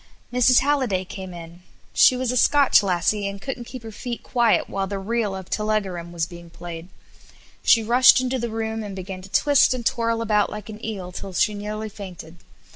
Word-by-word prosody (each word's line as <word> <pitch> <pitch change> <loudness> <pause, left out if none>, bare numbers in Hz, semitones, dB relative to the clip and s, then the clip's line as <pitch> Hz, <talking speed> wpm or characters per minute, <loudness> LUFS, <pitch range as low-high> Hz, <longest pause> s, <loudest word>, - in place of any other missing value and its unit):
Mrs. 250 0 +5
Halliday 260 -10 0
came 190 0 -8
in; 170 0 -11 0.3
she 255 - +5
was 255 -1 -1
a - - -2
Scotch 280 +1 +5
lassie, 200 +2 0
and 200 0 -6
couldn't 245 +2 -6
keep 250 -1 -9
her 225 - -8
feet 235 +2 -6
quiet 235 -3 +2
while 195 0 -3
the 200 +1 -4
"Reel 210 0 -2
of 190 -1 -8
Tullegoram" 195 -5 -2
was 170 -2 -1
being 170 0 -12
played; 170 0 -9 0.7
she 230 - +5
rushed 245 +4 +6
into 255 0 -1
the 235 0 -3
room 220 0 -3
and 205 -2 -6
began 185 0 -7
to 190 - -12
twist 280 +3 +4
and 240 -2 -6
twirl 230 -1 0
about 210 -2 +2
like 210 0 -8
an 215 +1 -10
eel 195 -5 -5
till 190 +1 -7
she 210 - +2
nearly 210 +1 -5
fainted. 180 -5 -10
210 Hz, 200 wpm, -23 LUFS, 185-235 Hz, 0.7 s, rushed